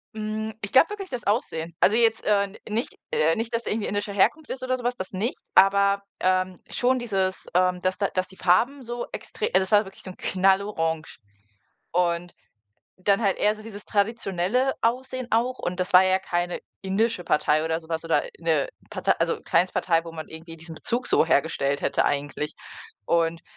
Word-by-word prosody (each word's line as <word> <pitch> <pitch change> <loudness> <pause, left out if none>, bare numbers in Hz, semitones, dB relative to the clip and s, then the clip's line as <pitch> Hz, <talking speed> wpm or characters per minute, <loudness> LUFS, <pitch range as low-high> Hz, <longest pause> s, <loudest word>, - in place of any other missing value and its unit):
Hm, 215 0 -4
ich 205 - -5
glaube 265 +8 +6
wirklich 405 -2 -6
das 250 -2 -5
Aussehen. 170 -6 -1
Also 210 - +4
jetzt, 230 -1 +3
äh, 205 -1 +3
n 200 +1 -12
nicht, 225 +3 -3
äh 160 +1 +3
nicht, 230 +1 -4
dass 230 0 -1
er - - -2
irgendwie 215 -1 -2
indische 205 +1 -2
Herkunft 295 +10 +2
ist 255 - -5
oder 255 0 0
so 250 - -8
was, 245 +1 0
das 185 -5 -6
nicht. 205 +6 -2 0.2
Aber, 200 +1 +5 0.2
ähm, 185 0 +1
schon 255 +1 +1
dieses, 195 -6 -1
ähm 180 0 +2
dass 185 +1 -1
da 200 - +2
dass 185 -1 -1
die 190 - -16
Farben 240 +10 +2
so 240 0 -5
extre 435 - -5
also - - +6
das 190 +1 -2
war 210 +1 +5
wirklich 190 - -13
so 185 - -7
'n 185 - -10
Knallorange. 190 -4 0 0.7
Und 175 0 0 0.6
dann 200 +2 +2
halt 200 -4 +2
eher 210 +1 +3
so 215 - -12
dieses 210 -2 -9
traditionelle 210 +3 0
Aussehen 255 +2 -1
auch 240 +3 +1
und 180 +1 -3
das 185 +2 -2
war 185 +1 +8
ja 185 0 +3
keine 175 -1 -2 0.2
indische 195 0 0
Partei 150 0 +2
oder 160 0 0
so 160 - -16
was 160 0 -2
oder 165 -3 +2 0.2
'ne 160 -4 +1 0.2
Partei - - +1
also - - 0
Kleinstpartei, 175 -2 +2
wo 165 - -7
man 160 -1 -7
irgendwie 165 +1 -10
diesen 160 0 -10
Bezug 240 +7 0
so - - +4
hergestellt 140 -3 +1
hätte - - +1
eigentlich. 145 +1 -2 0.5
Und, 165 +4 +1
195 Hz, 195 wpm, -25 LUFS, 175-225 Hz, 0.7 s, war